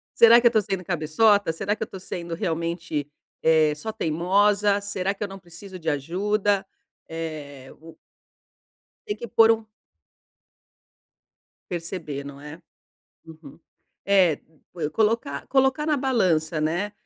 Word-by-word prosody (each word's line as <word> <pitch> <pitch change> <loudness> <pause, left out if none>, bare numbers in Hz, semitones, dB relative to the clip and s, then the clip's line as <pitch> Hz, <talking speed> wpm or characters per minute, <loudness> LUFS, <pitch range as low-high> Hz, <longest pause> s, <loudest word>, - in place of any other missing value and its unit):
"Será 235 +1 +8
que 240 - +6
eu - - +7
estou 220 -2 +2
sendo 195 -3 -4
cabeçota?"; 180 +4 +2
"Será 200 +5 -2
que 220 - -4
eu - - -3
estou 190 - -10
sendo, 170 -2 -6
realmente, 165 -4 -3 0.4
eh, 160 -1 +4
só 220 +9 -5
teimosa?"; 200 +3 +2
"Será 195 -1 -2
que 205 - -6
eu 205 - -2
não 195 0 -10
preciso 185 +2 -11
de 165 -1 -2
ajuda?"; 195 +7 0 0.4
eh, 150 -5 -7
o 165 -1 -13 1.1
Tem 415 - -2
que 235 - -8
pôr 225 0 +6
um 225 0 -3 2.1
Perceber, 165 -5 -5
não 140 0 -10
é? 150 +3 -10 0.7
Uhum. 160 -2 -14 0.5
É, 185 -6 +4 0.4
pue 160 -4 -3
colocar 215 -8 0
colocar 265 +2 +2
na 305 -1 +2
balança, 180 - +1
né: 175 +7 -1
180 Hz, 135 wpm, -24 LUFS, 160-210 Hz, 2.1 s, Será